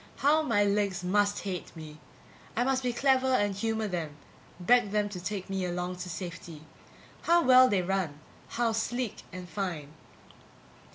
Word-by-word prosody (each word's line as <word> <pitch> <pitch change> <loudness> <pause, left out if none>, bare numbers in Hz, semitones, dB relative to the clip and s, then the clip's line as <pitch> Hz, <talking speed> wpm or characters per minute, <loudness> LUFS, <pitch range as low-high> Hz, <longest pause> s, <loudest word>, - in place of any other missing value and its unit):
How 300 +3 +3
my 230 -9 +2
legs 200 -2 0
must 205 +2 +1
hate 185 -3 -5
me! 155 -1 -10 0.6
I 240 - +2
must 265 0 +1
be 250 -1 0
clever 265 +1 +2
and 205 -3 +1
humor 220 +2 -1
them, 165 -6 -4 0.4
beg 240 +4 +4
them 210 0 0
to 180 -3 -8
take 195 -1 -4
me 195 -1 -2
along 180 0 -3
to 180 0 -6
safety. 170 -3 -7 0.6
How 340 0 +4
well 255 0 +7
they 190 -5 +1
run, 175 -6 -2 0.3
how 235 -1 0
sleek 230 +1 -2
and 180 -1 -8
fine! 170 -7 -4
200 Hz, 160 wpm, -29 LUFS, 180-235 Hz, 0.6 s, well